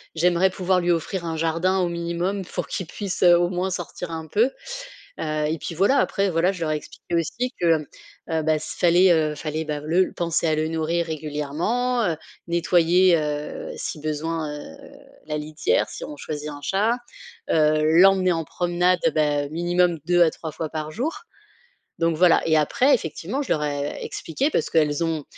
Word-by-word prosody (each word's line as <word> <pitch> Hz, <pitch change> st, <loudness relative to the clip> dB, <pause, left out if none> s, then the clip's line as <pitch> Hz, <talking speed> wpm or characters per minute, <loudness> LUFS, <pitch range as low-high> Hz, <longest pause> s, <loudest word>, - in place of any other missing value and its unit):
j'aimerais 175 Hz, +3 st, +3 dB
pouvoir 185 Hz, 0 st, +1 dB
lui 175 Hz, 0 st, +1 dB
offrir 170 Hz, +2 st, -2 dB
un 165 Hz, -1 st, -3 dB
jardin 165 Hz, +4 st, +1 dB
au 180 Hz, -2 st, +1 dB
minimum 170 Hz, +3 st, -2 dB
pour -, -, -4 dB
qu'il 185 Hz, -, -4 dB
puisse 195 Hz, -1 st, -5 dB
heu, 175 Hz, -1 st, +7 dB
au 175 Hz, 0 st, +1 dB
moins 185 Hz, +1 st, -1 dB
sortir 175 Hz, -1 st, -5 dB
un 160 Hz, -1 st, -5 dB
peu. 225 Hz, -, +2 dB, 0.7 s
Heu, 155 Hz, 0 st, -1 dB
et 160 Hz, +2 st, -1 dB
puis 170 Hz, -, -5 dB
voilà 200 Hz, -, +3 dB
après 200 Hz, -6 st, +1 dB
voilà, 175 Hz, +2 st, +2 dB
je 180 Hz, -3 st, -9 dB
leur 155 Hz, -, 0 dB
ai -, -, +1 dB
expliqué 160 Hz, +3 st, -6 dB
aussi 240 Hz, +10 st, -1 dB
que, 165 Hz, -2 st, +4 dB
mmh, 150 Hz, -, -8 dB, 0.5 s
heu, 160 Hz, -1 st, 0 dB
ben 155 Hz, 0 st, +2 dB
s 155 Hz, -, -7 dB
fallait, 180 Hz, +1 st, +5 dB
heu, 155 Hz, -2 st, +1 dB
fallait 155 Hz, +1 st, -3 dB
bah, 150 Hz, -1 st, -3 dB
le 175 Hz, +5 st, +2 dB
penser 170 Hz, -1 st, 0 dB
à 155 Hz, -, +2 dB
le 155 Hz, +1 st, 0 dB
nourrir 165 Hz, +1 st, -1 dB
régulièrement, 160 Hz, -, -1 dB
heu, 165 Hz, -3 st, 0 dB, 0.3 s
nettoyer, 170 Hz, +1 st, +4 dB
heu, 150 Hz, -1 st, -4 dB
si 150 Hz, -, -5 dB
besoin, 155 Hz, +1 st, -2 dB
heu, 80 Hz, -, -11 dB, 0.5 s
la 150 Hz, -1 st, -2 dB
litière, 150 Hz, +1 st, 0 dB
si -, -, -8 dB
on 150 Hz, -, -9 dB
choisit 150 Hz, 0 st, -5 dB
un 145 Hz, -1 st, -8 dB
chat, 210 Hz, +10 st, +1 dB, 0.5 s
heu, 155 Hz, -1 st, +3 dB, 0.2 s
l'emmener 190 Hz, -1 st, +5 dB
en 165 Hz, -1 st, -2 dB
promenade 175 Hz, +2 st, +1 dB, 0.2 s
beh, 145 Hz, -2 st, +1 dB
minimum 175 Hz, +1 st, +1 dB
2 175 Hz, 0 st, +3 dB
à 165 Hz, -, +4 dB
3 160 Hz, -, -7 dB
fois 155 Hz, +1 st, -5 dB
par 155 Hz, -1 st, -5 dB
jour. 315 Hz, -, -3 dB, 0.8 s
Donc 165 Hz, -1 st, +1 dB
voilà 175 Hz, 0 st, +5 dB
et 160 Hz, -, +4 dB
après 250 Hz, -, +3 dB
effectivement, 210 Hz, -, -3 dB
je -, -, -8 dB
leur 150 Hz, -, 0 dB
ai 145 Hz, 0 st, -3 dB
expliqué 265 Hz, -, -2 dB
parce 165 Hz, -, -1 dB
qu'elles 150 Hz, 0 st, +2 dB
ont 160 Hz, -3 st, -2 dB
165 Hz, 190 wpm, -23 LUFS, 155-180 Hz, 0.8 s, heu